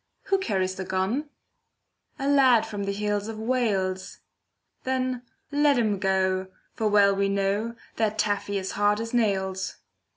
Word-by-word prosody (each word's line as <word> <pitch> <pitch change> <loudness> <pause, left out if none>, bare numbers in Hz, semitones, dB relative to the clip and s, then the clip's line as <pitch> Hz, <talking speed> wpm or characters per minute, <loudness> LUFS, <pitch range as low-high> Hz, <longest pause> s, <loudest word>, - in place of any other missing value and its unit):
Who 390 0 +3
carries 190 - 0
the 190 - -5
gun? 195 +11 -1 0.9
A 275 - -2
lad 260 -5 +5
from 205 -3 -4
the 200 - -1
hills 205 0 -1
of 225 -1 -5
Wales. 210 -6 -1 0.7
Then 255 -1 -1 0.3
let 290 -1 +3
him 215 -4 +1
go, 190 -1 +1 0.3
for 220 - -1
well 200 -1 +5
we 200 0 +1
know, 200 +4 0 0.2
That 215 -1 0
Taffy 205 -1 0
is 190 -1 -3
hard 205 +1 +2
as 230 +1 -5
nails. 190 -5 0
205 Hz, 150 wpm, -26 LUFS, 195-235 Hz, 0.9 s, lad